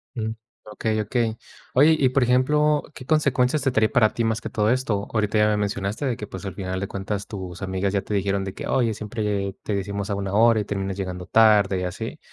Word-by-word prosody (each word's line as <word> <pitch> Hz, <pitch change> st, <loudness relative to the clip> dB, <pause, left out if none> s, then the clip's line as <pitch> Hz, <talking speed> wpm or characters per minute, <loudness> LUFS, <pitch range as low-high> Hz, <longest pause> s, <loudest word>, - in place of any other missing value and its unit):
Mm, 110 Hz, -2 st, -2 dB, 0.3 s
okey, 110 Hz, +1 st, -2 dB
okey. 110 Hz, +1 st, -1 dB, 0.4 s
Oye, 150 Hz, +5 st, +6 dB
y 135 Hz, -, +4 dB
por 130 Hz, +1 st, +1 dB
ejemplo, 150 Hz, +5 st, +3 dB
¿qué 130 Hz, -, -10 dB
consecuencias 140 Hz, -2 st, +2 dB
te 135 Hz, -, +2 dB
trae 110 Hz, -3 st, +3 dB
para 110 Hz, -4 st, +3 dB
ti 115 Hz, -, 0 dB
más 115 Hz, 0 st, 0 dB
que -, -, -5 dB
todo 105 Hz, 0 st, +1 dB
esto? 115 Hz, -5 st, 0 dB
Ahorita 110 Hz, -1 st, +1 dB
ya 105 Hz, -, +5 dB
me 105 Hz, -, +2 dB
mencionaste 105 Hz, +5 st, -2 dB
que, 105 Hz, -, -6 dB
pues, 95 Hz, -1 st, -8 dB
al 95 Hz, -, -5 dB
final 95 Hz, -1 st, -4 dB
de 100 Hz, -, -3 dB
cuentas 100 Hz, +1 st, -4 dB
tus 95 Hz, -4 st, -7 dB
amigas 95 Hz, +1 st, -1 dB
ya 100 Hz, -1 st, 0 dB
te 105 Hz, -, -4 dB
dijeron 100 Hz, 0 st, 0 dB
de 95 Hz, 0 st, -6 dB
que -, -, -7 dB
''Oye, 115 Hz, -4 st, +1 dB
siempre 105 Hz, -2 st, -3 dB
te 105 Hz, -, -2 dB
decimos 100 Hz, +1 st, -3 dB
a -, -, +1 dB
una 100 Hz, -1 st, -3 dB
hora 115 Hz, 0 st, +5 dB
y -, -, -2 dB
terminas 95 Hz, -1 st, -3 dB
llegando 90 Hz, -2 st, -5 dB
tarde'', 105 Hz, -4 st, +4 dB
y -, -, -3 dB
así, 110 Hz, -, -5 dB
105 Hz, 230 wpm, -24 LUFS, 100-120 Hz, 0.4 s, Oye